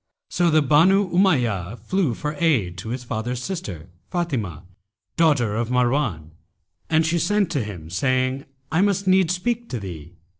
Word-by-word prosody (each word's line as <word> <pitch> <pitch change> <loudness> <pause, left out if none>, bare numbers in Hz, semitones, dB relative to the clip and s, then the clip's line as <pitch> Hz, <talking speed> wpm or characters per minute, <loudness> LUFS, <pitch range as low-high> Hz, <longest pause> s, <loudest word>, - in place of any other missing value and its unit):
So 175 -1 +2
the 155 -1 +4
Banu 180 +7 +4
Umayyah 120 - +1
flew 180 -9 -1
for 150 0 -3
aid 115 - +1
to 110 - -7
his 125 +1 -4
father's 120 +1 -4
sister, 100 - -5 0.2
Fátimah, 125 - -2 0.5
daughter 145 -10 +2
of 115 +1 -1
Marwan, 125 - 0 0.6
and 160 0 +3
she 170 +2 +1
sent 200 +1 +1
to 140 -8 0
him 85 -7 -8
saying, 130 +6 0 0.3
'I 160 +4 +2
must 200 -1 +1
needs 185 -2 +3
speak 235 +5 -2
to 120 - -3
thee.' 85 -3 -9
135 Hz, 155 wpm, -23 LUFS, 110-175 Hz, 0.6 s, the